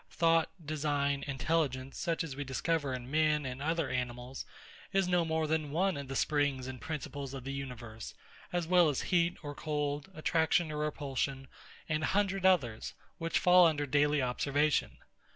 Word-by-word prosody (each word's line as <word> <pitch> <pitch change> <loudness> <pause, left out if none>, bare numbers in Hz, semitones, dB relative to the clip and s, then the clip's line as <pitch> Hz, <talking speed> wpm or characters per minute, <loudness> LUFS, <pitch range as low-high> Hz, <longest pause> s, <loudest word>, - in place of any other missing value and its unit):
Thought, 165 -1 +3 0.2
design, 145 -2 0
intelligence, 140 -2 -1
such 170 0 0
as 145 -5 -6
we 145 - -3
discover 140 +2 -1
in 125 +1 -8
men 155 -1 +2
and 130 +1 -5
other 165 0 0
animals, 125 0 -4 0.5
is 195 -2 +2
no 180 -1 +3
more 160 -1 0
than 155 -1 0
one 185 +5 +1
of 140 -1 -5
the 135 - -5
springs 145 -3 +1
and 130 -1 -7
principles 140 -3 -5
of 130 - -7
the 135 +1 -4
universe, 120 -5 -7 0.4
as 175 -1 0
well 175 -1 +5
as 140 - -1
heat 170 0 +3
or 145 -1 -5
cold, 145 0 -2
attraction 160 +1 +2
or 150 - -4
repulsion, 140 -2 -2 0.4
and 155 -1 0
a - - +1
hundred 195 -2 +2
others, 125 -13 +1 0.2
which 165 0 0
fall 180 -1 +7
under 145 -2 0
daily 145 +1 +2
observation. 140 +4 +1
145 Hz, 170 wpm, -32 LUFS, 135-165 Hz, 0.5 s, fall